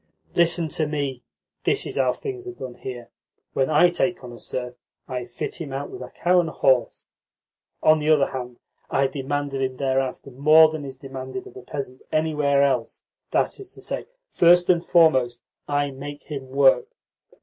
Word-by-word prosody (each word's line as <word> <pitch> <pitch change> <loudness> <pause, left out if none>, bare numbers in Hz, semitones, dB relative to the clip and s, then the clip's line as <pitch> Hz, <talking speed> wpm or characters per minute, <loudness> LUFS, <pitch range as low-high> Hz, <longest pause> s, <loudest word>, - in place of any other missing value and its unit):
"Listen 170 -1 +2
to 155 0 0
me. 140 -4 -3 0.4
This - - +2
is - - -4
how 130 -2 +3
things 380 - -6
are 370 - -5
done 125 - -7
here. 120 -1 -8 0.4
When 135 +1 +1
I 155 +3 +5
take 180 -2 -1
on 125 - -8
a 120 - -11
serf, 125 +3 -4 0.3
I 125 -2 -4
fit 125 - -5
him 145 -4 -5
out 135 +1 -4
with - - -8
a 125 - -7
cow 180 +5 +2
and 170 -2 0
a - - -10
horse. 130 -3 +2 0.8
On 155 0 +6
the 150 +1 -1
other 150 -3 +5
hand, 125 -2 -6 0.3
I 135 - +2
demand 145 +1 -2
of 135 - -2
him 130 -1 -2
thereafter 135 0 -1
more 155 +5 +6
than 155 -2 -5
is 135 -1 -7
demanded 135 +6 -7
of - - -13
a 130 - -9
peasant 130 0 -6
anywhere 150 -3 +2
else. 130 -5 -1 0.3
That - - 0
is 395 -2 -9
to - - -12
say, - - -4 0.2
first 175 +1 +5
and 170 -1 +1
foremost 130 -10 +3 0.2
I 145 -1 0
make 145 +2 -8
him 135 -3 -7
work. 135 - +4
140 Hz, 190 wpm, -24 LUFS, 130-155 Hz, 0.8 s, On